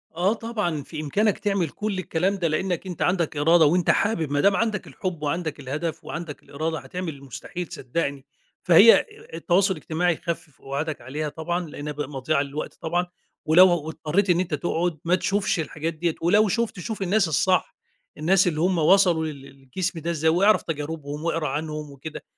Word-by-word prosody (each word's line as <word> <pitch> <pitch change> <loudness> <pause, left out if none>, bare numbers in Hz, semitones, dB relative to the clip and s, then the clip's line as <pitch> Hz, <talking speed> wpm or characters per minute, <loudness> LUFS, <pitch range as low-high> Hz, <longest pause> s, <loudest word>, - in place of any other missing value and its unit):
آه، 185 +5 +2
طبعًا 210 -10 -3
في 155 +2 -7
إمكانك 200 +8 +1
تعمل 195 -6 0
كل 210 +3 -3
الكلام 185 +2 0
ده، 180 -4 0
لأنّك 175 +3 -1
أنت 180 -3 -6
عَندك 175 -4 +1
إرادة 160 +2 +5
وأنت 175 +3 +2
حابب، 165 -9 0
ما 145 - +1
دام 200 +3 +4
عَندك 220 -1 -1
الحب 180 -5 -5
وعَندك 155 0 -2
الهدف 155 +4 -4
وعَندك 165 -3 -7
الإرادة 160 +3 -3
هتعمل 180 -3 -5
المستحيل 140 +6 -7
صدّقني. 140 0 -3 0.4
فهي 190 +6 +8
ا - - +3 0.3
التواصل 190 +3 +2
الاجتماعي 170 +1 0
خَفِف 165 -4 -6
قُعادك 145 +3 -4
عليها 150 +5 -4
طبعًا 170 +2 -3
لأنّها 150 0 -6
بق 150 0 -3
مضيَعة 140 +1 0
للوقت 145 +2 -5
طبعًا، 175 +2 0 0.4
ولو 175 +4 +7
و 175 -4 0
واضطرّيت 160 +5 -1
إن 175 -1 +4
أنت 180 -3 -2
تقعُد 165 +2 -1
ما 175 +2 +4
تشوفش 195 0 0
الحاجات 160 +1 -3
دِيَّة 165 +1 -1
ولو 205 +6 +4
شُفت 225 -1 -1
شوف 210 +4 -5
الناس 195 +1 +2
الصح، 180 +4 +1 0.4
الناس 185 +5 +3
اللي 155 -3 0
همَّ 180 +1 +2
وصلوا 170 0 +4
لل 150 -3 -6
لل 135 0 -14
للجسم 165 +6 -3
ده 165 +2 -2
إزاي، 160 -1 +1
واعرف 195 +6 +4
تجاربهم 150 -1 -5
وأقرأ 165 -2 -1
عنهم 150 +1 -4
وكده، 140 +3 -8
165 Hz, 180 wpm, -24 LUFS, 150-185 Hz, 0.4 s, فهي